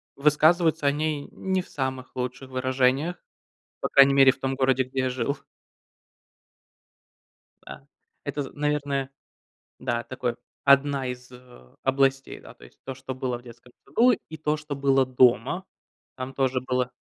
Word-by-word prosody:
высказываются 155 +2 +3
о 140 - +5
ней 150 -1 -2
не 190 -1 -2
в - - -19
самых 130 -2 -4
лучших 125 +1 -5
выражениях. 130 +5 +1 0.6
По - - -2
крайней 140 0 +6
мере 135 -1 +7
в 135 - -13
том 135 0 -1
городе, 130 -1 +2
где 130 +1 -5
я 130 0 +1
жил. 135 +3 -2 2.3
Да. 135 - -11 0.4
Это, 145 0 -3
з 135 - -9
наверное, 145 -2 -1 0.7
да, 120 0 -2
такое, 125 -2 -3 0.3
одна 140 -1 +4
из 125 0 -7 0.5
областей. 135 0 +1
Да. - - -13
То - - -17
есть - - -20
то, 135 - -4
что 130 0 -7
было 125 -1 -2
в 120 - -17
детском 120 +1 -15
саду, 245 +2 +4 0.2
и 160 - -7
то, 155 0 0
что 150 -1 -6
было 135 -1 +3
дома. 130 +7 +3 0.5
Там 130 +1 -6
тоже 130 -1 +1
было 125 -1 -1
135 Hz, 150 wpm, -25 LUFS, 130-145 Hz, 2.3 s, мере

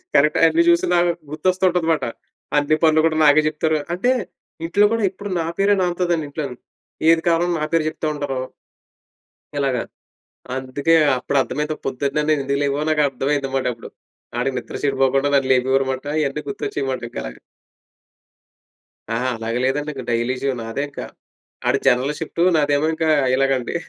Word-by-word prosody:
కరెక్టే. 150 +2 +4
అన్ని 165 +1 +3
చూసి 170 0 +4
నాకు 175 0 +3 0.2
గుర్తొస్తుంటది 180 +1 +1
మాట. 160 - -2 0.5
అన్ని 145 +1 +3
పనులు 155 -1 +5
కూడా 155 -1 -1
నాకే 145 +1 +6
చెప్తారు. 155 +1 0 0.2
అంటే 210 +8 +1 0.6
ఇంట్లో 205 +4 +4
కూడా 230 -2 0
ఎప్పుడు 200 +2 -8
నా 165 - -1
పేరే 200 +1 +4
నానుతదండి 175 -2 0
ఇంట్లోని. 140 -4 -5 0.5
ఏది 165 0 +3
కావాలన్నా 170 0 +1
నా - - -1
పేరు 165 -1 +3
చెప్తా 155 - -4
ఉంటారు. 140 -3 -3 1.2
ఇలాగ. 135 -3 0 0.8
అందుకే 135 +4 0 0.2
అప్పుడు 135 +3 -2
అర్దమైంది, 150 +3 -2
పొద్దున్నే 140 +3 -1
నేనేందుకు 140 -2 +1
లేగవనో 140 +2 0
నాకర్థమైంది 140 -2 0
మాటప్పుడు. 125 -3 -2 0.5
ఆడికి 130 +2 -1
నిద్ర - - -8
సెడిపోకుండా 135 0 +2
నన్ను 135 -1 +2
లేపేవారుమాట. 130 +1 0 0.2
ఇయన్నీ 145 +1 -2
గుర్తొచ్చేయమాట. 135 -1 -3
ఇంకలగ. - - -7 1.7
ఆ! 115 - -1 0.2
అలాగ 115 +1 -4
లేదండి. 145 +3 -1
ఇంక 130 -2 -7
డైలీ 120 +2 0
జీవ 135 0 +1
నాదే 115 +4 -4
ఇంక. 140 - -11 0.7
ఆడు - - +2
జనరల్ 130 +4 +3
షిఫ్ట్. 165 +1 -4 0.2
నాదేమో 145 0 +2
ఇంక 160 0 -1 0.3
ఇలాగండి. 135 0 0
145 Hz, 140 wpm, -21 LUFS, 135-160 Hz, 1.7 s, నాకే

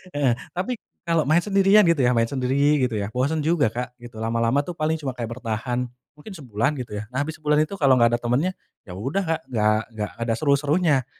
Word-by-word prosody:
heeh, 140 -4 +3 0.2
tapi 215 +8 -1 0.3
kalau 165 -2 +1
main 170 +3 +5
sendirian 200 +1 +5
gitu 170 -4 +3
ya, 125 -1 +4
main 115 - +4
sendiri 130 -1 -1 0.3
gitu 125 -3 0
ya, 100 +1 -4
bosen 140 +5 0
juga, 155 -8 +3
Kak, 125 +2 -5 0.2
lama-lama 115 +4 +1
tuh 175 - -5
paling 160 0 -1
cuma 140 -4 -4
kayak 115 -1 -5
bertahan 120 +2 -2 0.3
mungkin 195 +8 -10
sebulan 135 - -1
gitu 105 -4 -6
ya. 105 - -4
Nah, 130 - 0
abis 155 +1 -6
sebulan 150 -1 +1
itu 200 +5 -8
kalau 140 -6 +4
enggak 120 0 +4
ada 120 - -3
temennya, 125 +10 +1 0.4
ya - - -9
udah, 135 - -1
Kak, 160 0 0
nggak 110 -2 +2
nggak 105 -1 -4
ada 115 - +1
seru 140 0 +2
serunya. 150 -2 +1
135 Hz, 215 wpm, -23 LUFS, 115-160 Hz, 0.4 s, main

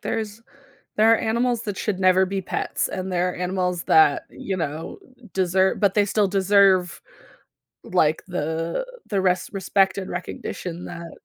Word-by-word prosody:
there's 220 0 -4 0.5
there 220 +1 +5
are - - +3
animals 235 +1 0
that 205 -4 -4
should 200 -4 -2
never 185 0 +4
be 195 +1 -3
pets, 185 - -2
and 185 0 -5
there 180 0 +1
are - - -9
animals 180 -1 -2
that, 155 -3 +4
you 190 - -5
know, 160 -1 -4 0.3
deser 190 0 +2
but 200 -2 +3
they 205 -1 +4
still 205 0 +1
deserve 195 -2 +3 0.8
like 155 +1 +1
the 165 - -2 0.2
the 200 -4 0
res 180 -1 +1
respect 195 -1 +1
and 190 -1 -5
recognition 175 -1 -6
that, 170 -1 -8
190 Hz, 155 wpm, -23 LUFS, 180-200 Hz, 0.8 s, there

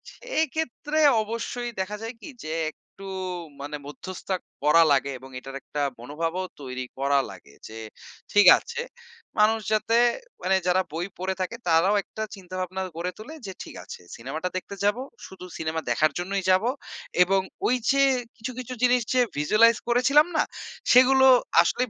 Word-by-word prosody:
সেই - - -1
ক্ষেত্রে 310 0 -2 0.2
অবশ্যই 230 +2 -4
দেখা 210 +3 -4
যায় 230 +2 -5
কি, - - -8
যে, 155 +1 -4 0.2
একটু 195 - -16 0.6
মানে 145 +1 -5
মধ্যস্থ 185 +6 -9 0.3
করা 165 +3 +6
লাগে 140 0 +2
এবং 130 +1 -12
এটার 135 +1 -9
একটা 145 - -4 0.2
মনোভাবও 165 +8 -3 0.2
তৈরি 130 -1 -5
করা 140 0 +3
লাগে। 70 - -14
যে, 110 - -10 0.6
ঠিক 205 -3 +6
আছে 475 +1 -5 0.6
মানুষ 220 +1 +4
যাতে 220 +2 +1 0.5
মানে 190 +1 +3
যারা 185 +1 +4
বই 175 +3 -2
পড়ে 190 +1 -1
থাকে 185 +6 -2
তারাও 170 +5 +4
একটা 220 - -6
চিন্তাভাবনা 185 0 -5 0.2
গড়ে 180 +2 -2
তোলে 260 +9 -9
যে, 190 - -5
ঠিক - - -11
আছে। - - -9
সিনেমাটা 155 +9 -4
দেখতে 200 +2 -6
যাব, 205 +3 +3 0.3
শুধু 185 -1 -11
সিনেমা 160 0 -2
দেখার 155 -1 +3
জন্যই 195 +1 -2
যাবো। 200 +6 +3 0.5
এবং 190 +1 +2 0.3
ওই 250 - +3 0.2
যে, 275 0 +3 0.4
কিছু, 230 +3 -5
কিছু 255 0 -6
জিনিস 250 0 +4
যে, 255 - +3 0.2
visualize 215 +9 +4
করেছিলাম 275 +6 +5
না - - +4 0.5
সেগুলো 265 +1 +7 0.4
আসলেই 245 +7 0
190 Hz, 155 wpm, -25 LUFS, 160-240 Hz, 0.6 s, সেগুলো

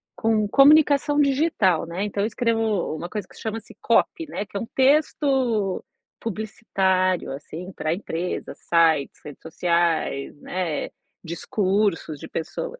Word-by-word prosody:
com 220 -2 +1
comunicação 290 +3 +5
digital, 275 - +2
né, 170 +4 -4
então 205 -1 -2
eu - - +1
escrevo 225 -6 0
uma 170 - -5
coisa 205 0 -5
que - - -19
chama-se 220 0 -6
copy, 330 - +1
né, 210 - -4
que - - -6
é - - -1
um - - -4
texto 265 -7 +2 0.4
publicitário, 190 -4 0
assim, 160 +6 -8
para 155 -2 -2
empresas, 175 -1 -4
sites, 160 -4 +3
redes 150 -2 -10
sociais, 170 -4 0
né, 175 -5 -3 0.3
discursos 185 -2 -1
de - - -8
pessoas. 480 - -5
200 Hz, 130 wpm, -24 LUFS, 170-230 Hz, 0.4 s, comunicação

